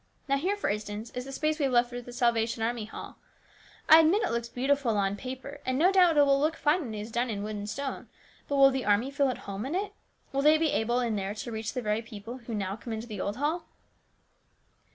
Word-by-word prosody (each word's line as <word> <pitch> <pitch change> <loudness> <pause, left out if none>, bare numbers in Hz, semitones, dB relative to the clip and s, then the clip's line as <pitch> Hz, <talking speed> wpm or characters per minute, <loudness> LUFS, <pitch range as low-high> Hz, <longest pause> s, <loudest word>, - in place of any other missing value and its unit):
Now, 275 0 +2
here, 370 +8 0
for 410 - -2
instance, 210 +2 -4
is 250 0 -5
the 270 - -7
space 310 +3 -1
we 285 - +2
have 270 - 0
left 240 0 +4
for 245 0 -6
the 245 - -11
Salvation 235 -2 +1
Army 230 -1 -1
Hall. 220 - -9 0.7
I 315 - +10
admit 330 +7 +4
it - - 0
looks 235 0 -2
beautiful 255 -2 +1
on 195 0 +1
paper, 260 +5 -7
and 255 - -1
it 330 - +4
will - - +7
no - - -5
doubt 355 -4 +5
look 285 +2 +4
fine 315 +4 +2
when 230 -8 -5
it 210 - -4
is 220 +2 -8
done 240 +2 0
in 205 -2 -3
wood 215 0 -4
and 205 0 -5
stone, 270 +5 -5 0.4
but 285 - -1
will 275 -1 +7
the 265 -1 -2
army 210 +6 +2
feel 280 -1 +2
at 255 - -2
home 200 +1 -4
in 275 +7 -3
it? 400 +1 -2 0.4
Will 275 - +1
they 305 +2 +6
be 315 -1 +1
able, 240 +3 +1
in 230 -3 0
there, 195 +1 -3
to 235 +3 -6
reach 220 -1 -4
the 250 -3 -3
very 210 +1 0
people 230 +2 -9
who 235 -2 -6
now 195 -1 -2
come 230 +1 -7
into 220 +1 -4
the 210 -5 -6
old 205 +3 -3
hall 310 +5 -1
245 Hz, 255 wpm, -28 LUFS, 220-285 Hz, 0.7 s, I